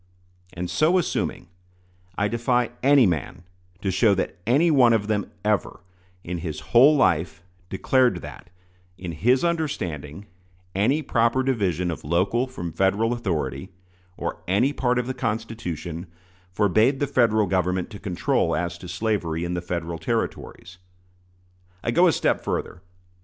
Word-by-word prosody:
And 90 0 -4
so 155 - +2
assuming, 180 - -2 0.7
I 100 - +1
defy 120 +2 0
any 140 -1 +6
man 90 0 -2 0.4
to 95 - 0
show 100 +2 +3
that 95 - -2
any 150 +8 +4
one 125 -5 +5
of 110 -2 +1
them 105 -1 -1 0.2
ever, 105 -3 0 0.4
in 90 0 -4
his 80 -3 -5
whole 135 +6 +7
life, 85 - +1 0.3
declared 125 +6 +1
that, - - -10 0.5
in 90 -2 -6
his 120 - +2
understanding, 100 - -3 0.5
any 130 +11 +1
proper 115 +1 +2
division 95 - 0
of 80 - -7
local 95 - +1
from 90 -10 -6
Federal 100 +6 +1
authority, 85 - -3 0.5
or - - -4
any 115 +10 +2
part 125 -3 0
of 125 - 0
the 130 - -3
Constitution, 105 - -4 0.4
forbade 110 +8 +2
the 145 - +1
Federal 115 -6 +2
Government 90 0 -1
to 100 - -9
control 90 -4 0
as 85 0 -3
to 90 - -9
slavery 90 -4 -2
in 85 - -3
the 90 - -2
Federal 85 -1 -4
Territories. 90 +4 -4 1.0
I - - 0
go - - +5
a - - +5
step - - 0
further. 90 - -3
100 Hz, 145 wpm, -24 LUFS, 90-120 Hz, 1.0 s, whole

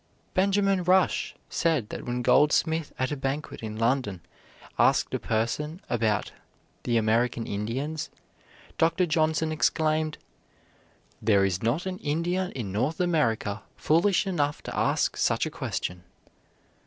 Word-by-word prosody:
Benjamin 195 0 +2
Rush 185 +1 +2
said 155 -10 0
that - - -7
when 120 0 -2
Goldsmith 160 +3 +3
at 130 +2 -1
a - - 0
banquet 135 +2 -4
in 110 -1 -5
London 115 -5 0 0.6
asked - - +3
a - - 0
question 115 +9 -2
about 110 -3 0 0.5
"the 120 -1 +1
American 115 +1 +1
Indians," 130 +10 -3 0.7
Dr. 165 +3 +3
Johnson 160 0 +1
exclaimed: 155 0 +1 1.0
"There 100 -3 +4
is 95 -2 -1
not 125 +11 0
an 185 -1 -4
Indian 175 +5 -1
in 110 -7 -4
North 130 +11 -1
America 115 - +1
foolish 180 +5 +2
enough 150 -6 -1
to - - -6
ask - - +1
such - - +1
a - - -4
question." 90 0 -4
145 Hz, 130 wpm, -27 LUFS, 115-165 Hz, 1.0 s, There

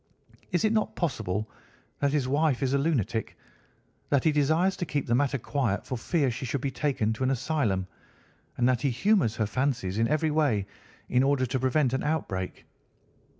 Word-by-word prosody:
Is 180 +4 +2
it 215 - +2
not 215 - 0
possible 110 - -2 0.5
that 140 -1 +2
his 140 -3 0
wife 145 -1 +1
is 135 0 +1
a - - +4
lunatic, 120 - -1 0.7
that 140 -3 +2
he 160 - +4
desires 160 +6 +2
to 175 - -2
keep 145 -3 -1
the 120 - 0
matter 140 +2 +2
quiet 125 -4 -1
for 130 - -3
fear 140 +3 0
she 120 - -6
should 130 +2 -2
be 140 - -1
taken 130 -6 0
to 110 - -4
an 130 - +2
asylum, 130 -8 0 0.7
and 120 - +3
that 125 -2 +2
he 140 - +2
humours 125 - +2
her 110 - 0
fancies 115 -5 -1
in 115 - +3
every 155 +1 +1
way 140 -10 +2 0.4
in 125 - +2
order 135 -1 +2
to 130 +2 -2
prevent 130 0 +2
an 130 - 0
outbreak?" 100 -12 -3
135 Hz, 190 wpm, -27 LUFS, 115-150 Hz, 0.7 s, a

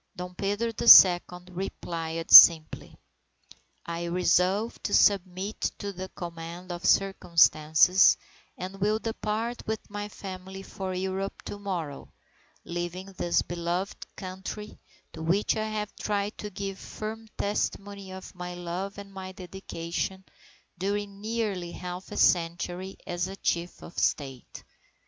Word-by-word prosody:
Dom 180 0 -7
Pedro 205 +5 -1
the 225 - -4
Second 180 -2 +8
replied 165 -3 -5
simply: 160 -2 +9 0.9
"I 170 0 -4
resolve 180 +5 +1
to 205 - 0
submit 195 +1 +2 0.2
to 200 -1 -5
the 185 +1 -7
command 170 +1 -8
of 175 0 -6
circumstances 170 -2 +4 0.4
and 190 +2 -7
will 210 +2 +2
depart 225 +1 -3
with 220 0 -3
my 205 0 -5
family 190 -1 -8
for 190 -1 -5
Europe 190 +1 -3
to 205 - -7
morrow, 175 -8 -5 0.5
leaving 175 +3 -5
this 175 -2 +1
beloved 175 +3 -4
Country 190 +3 -7 0.3
to 165 - -8
which 180 +6 +1
I 215 0 -1
have 210 -1 -4
tried 205 0 -2
to 210 - -5
give 195 0 -6
firm 220 +1 -7
testimony 200 -1 -3
of 190 0 -9
my 180 -1 -7
love 175 +3 -5
and 200 -1 -10
my 190 -1 -7
dedication 185 0 -5 0.5
during 200 +1 -3
nearly 210 -6 -3
half 180 +1 -7
a - - -6
century 175 +2 +1
as 175 -1 -2
chief 170 +1 -2
of - - -11
the - - -3
State. 135 -4 -2
190 Hz, 130 wpm, -27 LUFS, 175-200 Hz, 0.9 s, simply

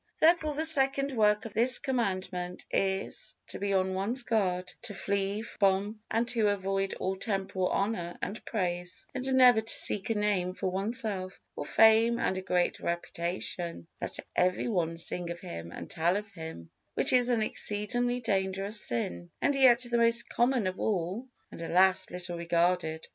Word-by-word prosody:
Therefore 315 -2 +3
the 315 +2 0
second 275 -2 +4
work 210 -1 +2
of 220 - -8
this 245 +4 +6
Commandment 185 -8 -3
is, 195 +2 -1
to - - -7
be 200 0 -2
on 190 -1 +1
one's 220 +7 +1
guard, 185 -6 -1
to 205 - -6
flee 200 +2 -2
from 205 0 0
and 230 +2 0
to 225 -3 +1
avoid 195 -1 -1
all 190 +1 -2
temporal 195 -2 -2
honor 180 -5 -2
and 210 - -5
praise, 180 -3 -3
and 260 +1 -2
never 250 -3 +6
to 225 - -2
seek 200 0 +2
a 225 - +1
name 190 -3 0
for 185 - -2
oneself, 195 -1 -2 0.2
or 145 - -5
fame 225 +1 +5
and 190 - 0
a 190 - -3
great 180 -1 0
reputation, 170 - -4
that - - -5 0.2
every 180 +4 +1
one 170 -7 -1
sing 170 +1 -3
of 170 0 -5
him 85 - -8
and - - -8
tell 170 +4 0
of 205 0 -7
him; 160 - -9 0.2
which - - +2
is 250 -1 +4
an 235 -3 +2
exceedingly 245 +4 +1
dangerous 195 0 -1
sin, 85 -7 -1
and 285 - +1
yet 260 -3 +5
the 240 -1 +1
most 235 0 +2
common 240 -2 +1
of 185 0 -3
all, 200 +4 -2 0.2
and, - - -9
alas! 185 +3 +3
little 175 -1 -6
regarded. 170 -1 0
195 Hz, 170 wpm, -29 LUFS, 180-230 Hz, 0.2 s, this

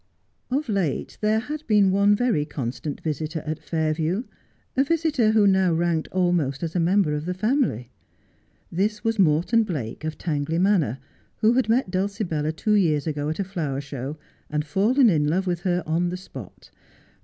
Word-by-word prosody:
Of 275 +4 -1
late 195 - -2
there 215 +1 +2
had 290 +7 -4
been 205 -3 +4
one 200 +2 +4
very 225 -10 +1
constant 140 0 -5
visitor 155 +1 -3
at 155 0 -3
Fairview, 160 +5 -1 0.5
a 265 - +4
visitor 300 -6 +1
who 215 -2 +5
now 190 -2 +4
ranked 165 -1 0
almost 175 -7 0
as 165 -1 -3
member 180 -1 +2
of 150 +1 -3
the 180 +1 -2
family. 200 - 0 0.8
This 210 +4 -1
was 225 -1 0
Morton 175 +7 +3
Blake, 150 - -4
of 155 -1 -4
Tangley 160 -1 -2
Manor, 175 - +2 0.4
who 220 +2 +5
had 255 -2 +1
met 230 -4 +2
Dulcibella 185 -5 -1
two 210 +7 -1
years 160 -8 +2
ago 150 -2 -2
at 155 - -3
a 200 - 0
flower 165 -8 -3
show 140 +1 -6 0.3
and 150 0 -1
fallen 220 - +3
in 155 -7 +3
love 185 +5 +1
with 175 -2 -1
her 180 0 0
on 170 +3 0
the 180 - -4
spot. 185 - -11
175 Hz, 170 wpm, -24 LUFS, 155-210 Hz, 0.8 s, who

